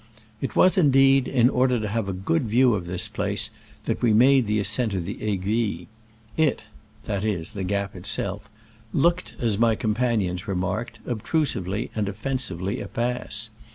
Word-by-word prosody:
It 135 - -3
was, 185 +1 +5
indeed, 135 -3 +5
in 125 -3 +4
order 125 -1 +2
to 110 - -2
have 105 -1 -2
a - - -2
good 120 - 0
view 125 +2 +4
of 90 -4 -3
this 90 +1 -3
place - - -1 0.3
that - - -2
we 115 -3 +3
made 130 +1 +5
the 105 +1 +1
ascent 105 +2 0
of 90 -3 -2
the 100 - -6
Aiguille. 105 +2 -1 0.5
It 155 -8 +1 0.4
(that 100 -3 -3
is, 95 -6 -2
the 95 - -5
gap 100 +1 -2
itself) 100 +2 -1 0.4
looked, 170 +5 +1
as 110 -4 0
my 115 -1 +4
companions 105 -5 -1
remarked, 95 +4 -3
obtrusively 110 - -1
and 105 -2 -1
offensively 105 -4 -3
a - - -5
pass. 115 -2 -2
110 Hz, 160 wpm, -24 LUFS, 100-125 Hz, 0.5 s, was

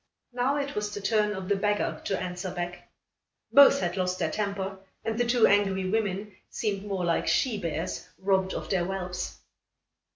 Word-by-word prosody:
Now, 250 +3 +1
it 285 0 -2
was 210 0 -2
the 205 - -5
turn 210 +1 +2
of 190 -1 -5
the 200 - +2
beggar 205 +1 0
to 195 - 0
answer 180 +1 -4
back. 175 0 -5 0.6
Both 280 -2 +8
had 175 -1 -1
lost 185 0 0
their - - -1
temper, 200 -2 -3 0.3
and 225 - -1
the 240 - +2
two 240 -1 +5
angry 195 -2 +3
women 205 -2 -1
seemed 205 -2 -2
more 190 -3 -1
like 170 -1 +1
she 235 -6 +2
bears 165 0 -3
robbed 190 -1 +1
of - - -4
their 185 -3 +2
whelps. 180 -1 -4
195 Hz, 175 wpm, -28 LUFS, 185-210 Hz, 0.6 s, Both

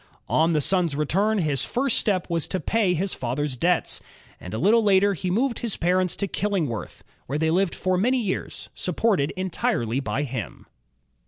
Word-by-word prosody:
On 165 +2 +3
the 150 - +2
son's 175 -2 +2
return, 195 +9 +1
his 150 -7 0
first 260 0 +1
step 190 -4 0
was 170 -2 -1
to 185 - -1
pay 205 -4 +1
his 190 +3 -1
father's 130 +3 -2
debts, 175 +8 0 0.4
and 90 - -9
a 110 - -3
little 215 - +4
later 200 -1 +4
he 185 0 -3
moved 235 +6 0
his 230 -4 -1
parents 180 +1 +1
to 200 - -2
Killingworth, 180 - -2 0.2
where 140 - -2
they 160 +1 +1
lived 185 +1 +1
for 185 0 0
many 250 +6 +2
years, 210 -6 -3
supported 180 -4 +1
entirely 135 -10 -1
by 140 0 -2
him. 125 -7 -6
180 Hz, 175 wpm, -24 LUFS, 150-200 Hz, 0.4 s, little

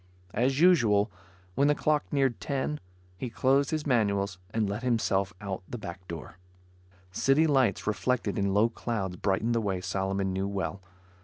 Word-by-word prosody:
As 130 +4 +1
usual, 115 - +4 0.4
when 140 +8 +3
the 145 - +4
clock 150 0 0
neared 135 -4 +1
ten, 140 +1 -2 0.4
he 125 - -3
closed 135 +4 +2
his 155 -1 -2
manuals 100 -6 +1
and 110 +1 0
let 100 +3 -3
himself 105 -6 +1
out 100 -2 -4
the 120 - -5
back 90 -3 -8
door. 85 +2 -8 0.7
City 135 +10 +3
lights, 130 - +2
reflected 105 0 0
in 100 0 +1
low 105 +3 +4
clouds, 105 -6 -3
brightened 100 +5 0
the 115 - +1
way 95 -3 -1
Solomon 95 0 -1
knew 95 +1 -1
well. 100 0 -3
105 Hz, 160 wpm, -28 LUFS, 95-130 Hz, 0.7 s, usual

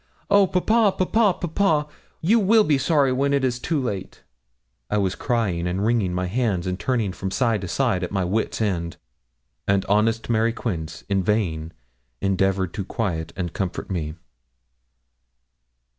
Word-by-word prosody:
Oh, 200 -1 +6
papa, 210 +3 +2
papa, 205 -4 +2
papa! 160 -3 +1 0.3
you 215 +8 +4
will 215 +2 +5
be 145 -7 +2
sorry 140 -2 +3
when 140 +2 +1
it 140 -1 +2
is 125 -2 0
too 160 +3 -1
late.' 100 -8 -5 0.7
I 105 - +1
was 95 -2 +1
crying 95 -9 -1
and 95 +3 -1
wringing 110 -5 +1
my 90 +1 -1
hands, 100 -3 0
and 90 0 -2
turning 115 -7 0
from 95 +1 -4
side 115 0 +1
to 95 - -5
side, 105 -2 0
at 90 - -3
my 95 -2 0
wits' 110 +4 -1
ends, 85 -5 -2 0.7
and 100 -1 +2
honest 110 +3 +1
Mary 115 0 +2
Quince 85 -9 -4
in 100 -1 +1
vain 85 -6 -1 0.5
endevoured 95 -1 0
to 100 - -3
quiet 85 -6 -3
and 85 -3 -4
comfort 95 0 -4
me. 80 -4 -3
105 Hz, 160 wpm, -23 LUFS, 90-135 Hz, 0.7 s, Oh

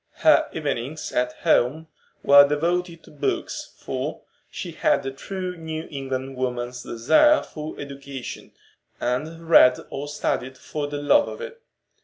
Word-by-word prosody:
Her - - +6
evenings 140 +7 -3
at 125 0 0
home 150 +7 +2 0.4
were 140 0 +8
devoted 170 +3 -1
to - - -16
books, 145 -1 -3
for - - -4 0.3
she - - -6
had - - +1
the 135 - -3
true 185 +6 -5
New 160 -1 -6
England 135 -1 -4
woman's 125 -1 -3
desire 155 - +4
for 155 0 -8
education, 140 -2 -8 0.5
and 160 +7 -3
read 125 -6 +7
or 140 +1 -4
studied 130 -3 -2
for 145 +2 -4
the 145 0 -4
love 285 - +4
of - - -7
it. 475 -1 -8
145 Hz, 140 wpm, -24 LUFS, 130-165 Hz, 0.5 s, were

